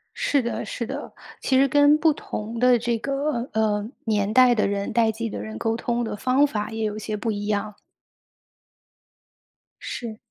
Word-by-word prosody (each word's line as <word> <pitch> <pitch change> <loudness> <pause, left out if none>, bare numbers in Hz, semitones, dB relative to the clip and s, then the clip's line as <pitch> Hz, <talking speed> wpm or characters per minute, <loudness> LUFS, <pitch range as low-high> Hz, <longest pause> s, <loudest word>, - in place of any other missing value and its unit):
是 285 - +1
的， 235 -1 -3
是 235 - -4
的， 275 +5 -6 0.3
其 260 - +1
实 275 +1 +5
跟 290 +2 +5
不 320 +1 +4
同 225 -3 -6
的 250 0 +5
这 235 0 -1
个， 275 -1 -2
呃， 215 -1 +1 0.2
年 210 -2 +1
代 255 0 +6
的 215 - +1
人、 200 0 -2
代 230 -2 +3
际 225 +1 -4
的 - - -5
人， 110 +1 -7
沟 225 - 0
通 240 0 -1
的 220 - -3
方 255 +6 +3
法 210 -7 -3
也 225 0 -4
有 210 -1 -1
一 - - -4
些 215 0 -4
不 220 +2 -2
一 205 -1 -4
样。 210 0 -1 2.1
是。 230 -3 -5
230 Hz, 200 characters per minute, -24 LUFS, 215-255 Hz, 2.1 s, 代